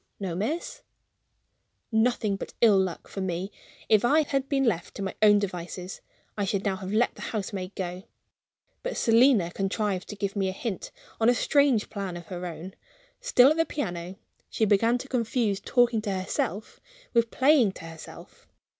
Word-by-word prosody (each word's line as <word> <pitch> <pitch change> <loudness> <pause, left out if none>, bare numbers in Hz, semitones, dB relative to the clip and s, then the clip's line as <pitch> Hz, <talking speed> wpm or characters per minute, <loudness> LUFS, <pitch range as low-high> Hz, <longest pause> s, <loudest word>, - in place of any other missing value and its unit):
"No, 190 -4 -3
miss." 310 - -3 1.1
Nothing 220 -2 +1
but - - -8
ill 215 -4 +6
luck 185 -3 -2
for 195 - -6
me! 185 +1 -3 0.4
If 215 -2 +4
I 300 +6 +4
had 275 -1 -2
been 275 -1 +1
left 180 -9 -1
to 200 - -4
my 190 - -3
own 210 -1 +7
devices, 180 -1 -5 0.3
I 205 - -1
should 195 +1 -1
now 195 -2 0
have 190 0 -6
let 220 +3 +2
the - - -13
housemaid 195 -3 -4
go. 180 0 -5 0.8
But - - -4
Selina 230 -6 +4
contrived 195 0 -2
to 210 - -6
give 200 0 -3
me 195 -2 0
a - - -4
hint, 200 0 -5 0.3
on 225 +1 +4
a 245 - +4
strange 280 -5 +2
plan 195 -4 -4
of 170 - -10
her 180 -1 -5
own. 175 +2 -8 0.5
Still 290 - +5
at 310 - 0
the 325 - +4
piano, 180 - -4 0.3
she 220 - +1
began 225 +4 +3
to 255 - -8
confuse 230 -5 0
talking 240 -1 +2
to 210 -2 -3
herself 190 +1 -3 0.3
with 235 -1 +3
playing 260 -7 +4
to 165 - -10
herself. 165 -1 -12
205 Hz, 175 wpm, -27 LUFS, 190-240 Hz, 1.1 s, own